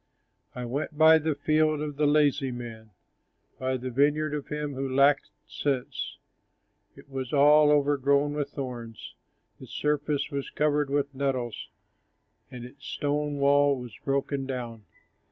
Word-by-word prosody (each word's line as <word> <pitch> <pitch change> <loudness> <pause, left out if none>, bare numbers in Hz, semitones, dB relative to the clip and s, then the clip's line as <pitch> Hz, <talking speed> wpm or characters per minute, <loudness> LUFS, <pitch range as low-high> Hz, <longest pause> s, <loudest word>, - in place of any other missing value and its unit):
I 125 -1 -5
went 140 +5 -4
by 160 +1 +7
the 155 -1 -1
field 155 +1 +1
of 150 -1 -4
the 150 +1 +2
lazy 145 -2 +2
man, 115 -3 -8 0.7
By 130 0 -1
the 130 +1 -5
vineyard 145 +4 +1
of 150 -2 -4
him 150 -1 -4
who 135 0 -3
lacked 140 +1 +3 0.2
sense, 135 -4 -3 0.8
It - - -16
was 135 -2 -5
all 150 +1 +6
overgrown 145 0 +2
with 145 -1 -2
thorns, 120 -5 -7 0.5
Its - - -12
surface 150 -1 -1
was 140 -1 -4
covered 150 -1 0
with 140 0 -1
nettles, 130 -4 -3 0.8
And 125 -1 -8
its 130 +3 -15
stone 145 +1 -2
wall 140 0 +3
was 120 -4 -9
broken 135 0 -1
down. 120 -5 -6
140 Hz, 140 wpm, -27 LUFS, 130-150 Hz, 0.8 s, by